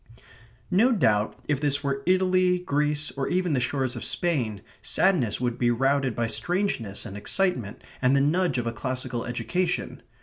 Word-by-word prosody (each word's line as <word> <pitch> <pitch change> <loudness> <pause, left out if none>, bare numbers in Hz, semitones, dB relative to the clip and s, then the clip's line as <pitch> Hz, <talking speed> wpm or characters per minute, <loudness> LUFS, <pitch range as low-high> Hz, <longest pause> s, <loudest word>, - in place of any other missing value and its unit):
No 220 +8 +4
doubt 110 - +1
if 145 -2 0
this 145 -1 +1
were 140 -1 -1
Italy, 185 -1 +3
Greece, 150 -3 -1
or 135 -1 -3
even 180 -2 0
the 130 - +2
shores 130 0 -1
of 120 - -6
Spain, 125 - -1 0.2
sadness 165 - +1
would 120 -1 -2
be 120 - +3
routed 135 0 +1
by 120 - 0
strangeness 120 - -1
and 100 - -7
excitement 125 - -1 0.2
and 130 +1 +3
the - - +4
nudge 170 +3 +1
of 120 - -1
a 115 - -2
classical 125 +1 -3
education. 180 +9 -2
140 Hz, 165 wpm, -26 LUFS, 120-180 Hz, 0.2 s, No